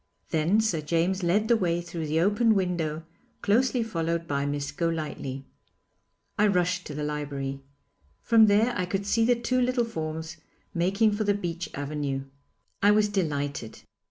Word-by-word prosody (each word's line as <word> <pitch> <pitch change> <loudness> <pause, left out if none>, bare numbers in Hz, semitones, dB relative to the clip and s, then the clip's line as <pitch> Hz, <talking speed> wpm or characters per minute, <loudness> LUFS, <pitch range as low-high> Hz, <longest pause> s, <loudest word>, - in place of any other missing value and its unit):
Then 170 +7 +3
Sir 185 -8 0
James 170 +5 0
led 195 +5 +2
the 235 - +5
way 175 -5 +1
through 170 -2 -5
the 155 +2 +1
open 210 +4 +3
window, 170 -5 -1 0.4
closely 245 +3 +2
followed 165 -5 -2
by 140 0 -1
Miss 145 0 -2
Golightly. 150 -5 -3 0.9
I 210 - +5
rushed 180 -2 +1
to 150 - -7
the 150 - -3
library. 140 -2 -4 0.6
From 225 -2 +6
there 215 +4 +3
I 180 -4 -1
could 195 +2 -2
see 225 +2 +2
the 245 +1 +4
two 245 +2 0
little 250 -1 +1
forms 160 -5 -5 0.4
making 195 +6 +2
for 210 +1 -1
the 205 -1 +2
beech 175 -3 -4
avenue. 140 -1 -3 0.6
I 205 - +5
was 210 0 +4
delighted. 145 - -3
175 Hz, 155 wpm, -27 LUFS, 155-210 Hz, 0.9 s, From